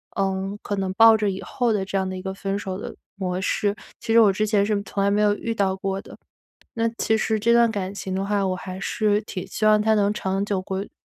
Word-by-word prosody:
嗯， 195 0 -1
可 205 - -3
能 190 -1 -2
抱 225 +1 +7
着 210 - 0
以 190 - -6
后 230 +5 0
的 200 - 0
这 195 - -2
样 190 -1 0
的 185 - -4
一 185 - -6
个 190 0 -5
分 195 +1 -3
手 190 -2 -4
的 - - -7 0.2
模 185 -1 -3
式， 205 +1 0 0.2
其 225 - -2
实 230 - +7
我 210 -3 +6
之 215 +3 0
前 205 -2 +2
是 205 -1 0
从 200 0 -2
来 200 - +3
没 205 +1 +2
有 205 - +4
遇 230 +2 -4
到 195 -3 +1
过 195 0 -3
的。 - - -12 0.6
那 230 0 0
其 220 - +2
实 220 0 0
这 235 +2 +3
段 235 -1 +5
感 195 -2 -3
情 190 -2 -5
的 190 - -1
话， 200 -1 +1
我 185 - 0
还 185 0 -7
是 210 +1 0
挺 185 -3 -6
希 215 - -4
望 215 0 +5
它 220 +1 +3
能 205 -1 +2
长 195 -1 -2
久 200 -2 -1
归 190 +1 -5
200 Hz, 285 characters per minute, -23 LUFS, 190-215 Hz, 0.6 s, 抱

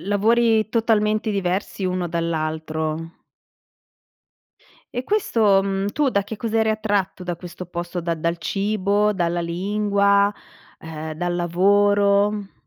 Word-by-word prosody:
lavori 220 +3 +2
totalmente 215 -1 +1
diversi 195 0 -2
uno 180 -1 -1
dall'altro. 160 -1 -3 1.8
E 245 +1 -3
questo 220 - +2
mhmm, 195 0 -1
tu 290 -3 +1
da 200 -4 +1
che 210 +2 -7
cosa 225 +1 -1
eri 220 0 +2
attratto 205 -4 -1
da 175 -1 -2
questo 175 +1 -9
posto 175 0 -5
da 170 0 -1
dal 170 +2 -1
cibo, 205 +3 0
dalla 175 -1 0
lingua, 200 +3 +2 0.5
urhm, 160 -1 -6
dal 175 +2 -2
lavoro? 200 +3 +2
195 Hz, 120 wpm, -22 LUFS, 175-210 Hz, 1.8 s, lavori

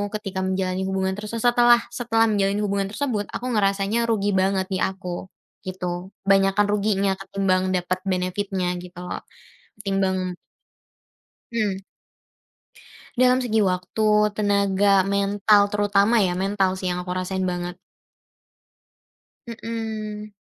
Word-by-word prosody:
ketika 195 -3 -4
menjalani 185 0 -1
hubungan 190 0 -1
tersesa 230 +3 0
setelah 240 0 +6 0.2
setelah 225 -2 +2
menjalin 200 0 +1
hubungan 200 -1 -1
tersebut 235 -7 -1
aku 250 - -4
ngerasanya 200 +2 +1
rugi 205 -2 +1
banget 190 0 +1
di - - 0
aku, 190 -1 -3 0.4
gitu. 180 0 -4 0.2
Banyakan 195 +1 +4
ruginya 200 -2 +1
ketimbang 190 -1 0
dapat 180 +1 -1
benefit-nya 185 0 -1
gitu 180 -1 -13
lho. 180 - -5 0.6
Ketimbang 190 -2 -1 1.2
Mmm. 210 -4 -1 1.4
Dalam 255 0 +4
segi 220 -3 +1
waktu, 185 +4 0 0.3
tenaga, 200 -1 +3
mental 200 +1 +3
terutama 205 +2 +3
ya, 180 -2 +1
mental 195 0 +1
sih 185 -1 -2
yang 180 - -2
aku 180 0 -4
rasain 185 0 -2
banget. 175 0 -4 1.7
Mhm. 220 -2 -5
195 Hz, 115 wpm, -23 LUFS, 185-210 Hz, 1.7 s, setelah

